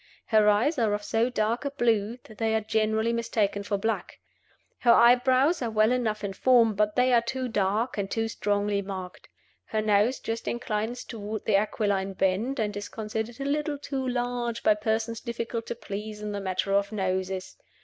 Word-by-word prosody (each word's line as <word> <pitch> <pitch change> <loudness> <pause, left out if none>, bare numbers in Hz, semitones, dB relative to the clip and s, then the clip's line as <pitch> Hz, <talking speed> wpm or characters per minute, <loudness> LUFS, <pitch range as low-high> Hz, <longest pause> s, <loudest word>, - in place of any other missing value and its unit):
Her 215 -2 +4
eyes 240 +9 +2
are 215 -3 +2
of 205 - -6
so 225 +3 +1
dark 230 0 0
a 280 - -1
blue 230 -4 0
that 215 - -15
they 220 0 +1
are 220 - +1
generally 220 +1 +1
mistaken 220 -3 0
for 200 0 -1
black. 225 +3 -3 0.6
Her 240 - +5
eyebrows 255 +7 +5
are 240 - -1
well 215 +1 +3
enough 225 -4 -1
in 200 -1 -3
form, 235 +1 +4
but 210 +1 0
they 250 0 +3
are 235 - +5
too 255 +2 -3
dark 210 +2 0
and 195 -1 -2
too 225 +1 -1
strongly 205 -2 0
marked. 190 -2 -7 0.4
Her 220 - -2
nose 215 +4 +2
just 225 0 -4
inclines 235 +1 -2
toward 215 -1 -6
the 215 - +3
aquiline 200 -2 0
bend, 195 +9 0
and 210 -2 -1
is 205 0 -5
considered 220 +2 -4
a 275 - -3
little 295 +1 -1
too 270 -2 -4
large 245 -1 -2
by 215 - +5
persons 220 +2 -2
difficult 230 -1 -4
to - - -3
please 210 -1 -6
in 210 0 -4
the 200 -1 -4
matter 190 +1 -1
of 200 +1 +2
noses. 190 -2 -2
220 Hz, 190 wpm, -27 LUFS, 205-240 Hz, 0.6 s, Her